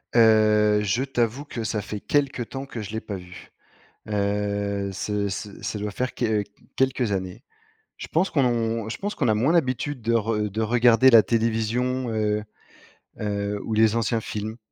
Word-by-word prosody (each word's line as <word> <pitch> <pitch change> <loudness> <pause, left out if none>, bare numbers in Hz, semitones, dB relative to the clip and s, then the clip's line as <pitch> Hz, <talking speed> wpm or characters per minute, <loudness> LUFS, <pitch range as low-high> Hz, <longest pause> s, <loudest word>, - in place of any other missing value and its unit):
Heu, 110 -2 +5
je 120 +6 0
t'avoue 130 +1 -1
que 115 -5 -5
ça 110 -1 -2
fait 105 0 -6
quelque 140 -2 0
temps 135 +3 -7
que 115 - -6
je 100 - -7
l'ai 110 0 -3
pas 105 -2 -6
vu, 90 +1 -11 0.6
heu, 100 -1 -1
ce 105 +1 -2
ce 100 +1 -6
ça 105 - -3
doit 105 0 -3
faire 125 +5 -3
que 110 -4 0 0.3
quelques 130 -4 +1
années. 95 +5 -4 0.5
Je - - -8
pense 175 +4 +1
qu'on 115 -5 0
je 110 - -4
pense 205 +1 -3
qu'on 125 -7 0
a 110 - +4
moins 130 +10 +2
d'habitude 135 -4 0
de 115 +1 0
re 105 -1 0
de 110 +3 -3
regarder 120 +3 +5
la 115 -3 +8
télévision, 115 +3 0
heu 105 -1 0 0.8
heu, 100 -1 -2
ou 110 - -3
les 110 0 +4
anciens 115 0 +1
films. 110 +2 -5
110 Hz, 175 wpm, -24 LUFS, 105-120 Hz, 0.8 s, la